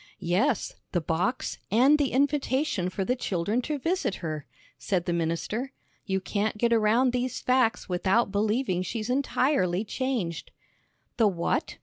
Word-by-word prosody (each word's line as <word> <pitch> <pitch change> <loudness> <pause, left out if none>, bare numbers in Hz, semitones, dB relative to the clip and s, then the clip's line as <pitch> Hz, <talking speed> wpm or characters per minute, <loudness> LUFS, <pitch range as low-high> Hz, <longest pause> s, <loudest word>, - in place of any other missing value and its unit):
"Yes, 195 +8 0 0.2
the 175 - +2
box, 175 - -1
and 265 +8 +5
the 280 -3 +1
invitation 275 - +1
for 190 +1 -3
the 250 - +1
children 205 0 -1
to 300 +4 -2
visit 330 - -1
her," 155 -4 -5 0.3
said 180 -3 -1
the 175 - 0
minister. 170 - -2 0.3
"You 190 -1 +1
can't 205 +3 -2
get 235 +2 +2
around 230 +3 +3
these 250 0 -1
facts 250 -3 +1
without 190 +4 +1
believing 210 -1 0
she's 220 +4 -3
entirely 255 -8 +1
changed." 220 -9 -2 0.7
"The 225 -3 +5
what?" 175 -4 -1
220 Hz, 140 wpm, -27 LUFS, 185-255 Hz, 0.7 s, and